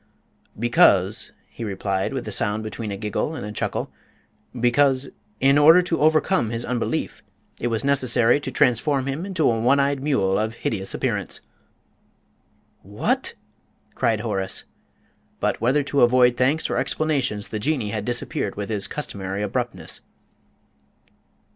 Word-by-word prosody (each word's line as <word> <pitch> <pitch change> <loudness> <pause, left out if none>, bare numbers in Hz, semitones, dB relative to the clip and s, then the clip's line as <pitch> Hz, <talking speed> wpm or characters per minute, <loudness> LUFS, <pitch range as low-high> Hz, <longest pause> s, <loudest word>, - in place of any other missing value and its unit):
"Because," 105 -3 +3 0.2
he 120 - -9
replied, 95 -1 -2
with 130 -4 -4
a - - -4
sound 105 +2 0
between 110 0 -5
a 100 - -4
giggle 105 +9 -2
and 105 - -6
a 105 - -6
chuckle, - - -3 0.7
"because, 130 +2 +2 0.3
in 135 +2 +4
order 165 +5 +7
to 170 -3 -2
overcome 155 - +3
his 115 +1 -4
unbelief, 120 -2 -2 0.4
it 120 - -1
was 115 0 -1
necessary 130 -2 +3
to 135 - -5
transform 130 +2 +1
him 140 +7 -3
into 185 -6 +1
a 115 -1 +2
one 130 +5 +3
eyed 140 -1 +1
mule 100 -10 +1
of 110 +1 -2
hideous 95 -5 -2
appearance." - - -2 1.4
"What!" 100 +2 -2 0.6
cried 110 -2 0
Horace. 95 -4 -2 0.8
But, - - -1
whether 130 +5 +2
to 140 0 0
avoid 125 0 +5
thanks 135 +6 +1
or - - -2
explanations, 135 -10 -1
the 110 - -4
Jinnee 120 -3 -1
had 105 -1 -3
disappeared 120 +2 -2
with 100 +1 -5
his 105 -3 -1
customary 100 -8 -4
abruptness. 105 -5 -4
120 Hz, 140 wpm, -23 LUFS, 105-140 Hz, 1.4 s, order